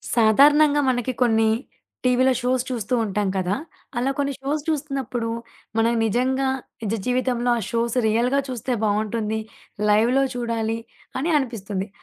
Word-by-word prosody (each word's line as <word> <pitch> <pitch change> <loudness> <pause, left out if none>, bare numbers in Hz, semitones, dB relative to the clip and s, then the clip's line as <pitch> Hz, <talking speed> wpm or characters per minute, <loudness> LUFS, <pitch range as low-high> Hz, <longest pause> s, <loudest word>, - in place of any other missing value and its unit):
సాధారణంగా 290 +6 +5
మనకి 250 0 0
కొన్ని 225 -2 +4 0.6
టీవీ‌లో 255 +1 +4
షోస్ 250 0 +1
చూస్తూ 240 -1 -3
ఉంటాం 205 -1 -1
కదా! 185 +1 0 0.4
అలా 255 +3 +1
కొన్ని 280 -1 0
షోస్ 290 +3 -1
చూస్తున్నప్పుడు, 275 -6 -2 0.5
మనం 230 +1 +3
నిజంగా 260 +4 +1 0.3
నిజ 210 0 -1
జీవితంలో 250 -1 0
ఆ - - -4
షోస్ 235 0 -1
రియల్‌గా 240 +5 +2
చూస్తే 255 0 -3
బావుంటుంది, 215 +1 0 0.5
లైవ్‌లో 235 +6 +4
చూడాలి, 230 -2 -1 0.4
అని 320 +6 0
అనిపిస్తుంది. 210 -7 -3
240 Hz, 125 wpm, -23 LUFS, 220-265 Hz, 0.6 s, సాధారణంగా